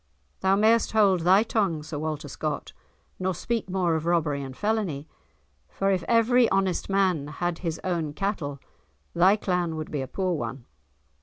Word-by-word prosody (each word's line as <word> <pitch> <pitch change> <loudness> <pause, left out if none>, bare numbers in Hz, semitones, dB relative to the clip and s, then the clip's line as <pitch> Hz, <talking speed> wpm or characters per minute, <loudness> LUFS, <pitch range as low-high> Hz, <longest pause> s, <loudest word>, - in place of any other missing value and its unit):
"Thou 190 +1 +3
mayest 220 +3 +3
hold 200 -4 +4
thy 185 +5 +5
tongue, 195 -9 0
Sir 150 -1 -5
Walter 155 -1 -3
Scott, - - -4 0.5
nor 185 -1 -1
speak 230 +2 -3
more 180 -2 +1
of 160 +1 -2
robbery 155 -5 +1
and 135 -1 -8
felony, 205 -9 -1 0.6
for 195 0 0
if 185 -2 +1
every 235 +1 +4
honest 195 -1 0
man 185 -7 +1
had 175 +2 -3
his 165 -3 -3
own 170 -5 -1
cattle 160 -6 -3 0.6
thy 185 +4 +5
clan 180 -5 -1
would 155 -1 -6
be 145 - -2
a 130 - -4
poor 185 +5 -1
one." 135 -5 -5
180 Hz, 165 wpm, -26 LUFS, 155-195 Hz, 0.6 s, thy